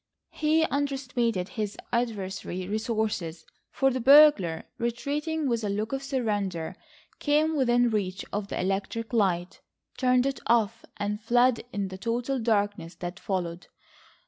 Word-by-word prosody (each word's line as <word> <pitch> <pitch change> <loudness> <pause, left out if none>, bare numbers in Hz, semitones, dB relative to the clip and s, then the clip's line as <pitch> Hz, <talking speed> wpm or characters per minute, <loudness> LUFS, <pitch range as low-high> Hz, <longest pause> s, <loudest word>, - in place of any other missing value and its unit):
He 315 +1 +2
underestimated 260 - -1
his 210 -2 -4 0.2
adversary's 195 -6 -2
resources, 215 -6 -2 0.2
for 270 0 +2
the 260 - -2
burglar, 260 - +6 0.2
retreating 290 +6 -1
with 235 -3 0
a 205 - -1
look 215 +4 -2
of 270 - -1
surrender, 205 - -2 0.4
came 305 +2 +2
within 245 -3 +3
reach 190 -3 -2
of 205 0 -2
the - - -4
electric 195 +5 -2
light, 185 -5 0 0.4
turned 255 -1 +3
it 275 0 -1
off, 230 -1 +2
and 210 +1 -2
fled 240 +1 +3
in 200 -1 -2
the 185 0 -8
total 240 +4 -1
darkness 205 -6 0
that 175 +1 -6
followed. 175 -3 -3
225 Hz, 135 wpm, -27 LUFS, 195-255 Hz, 0.4 s, burglar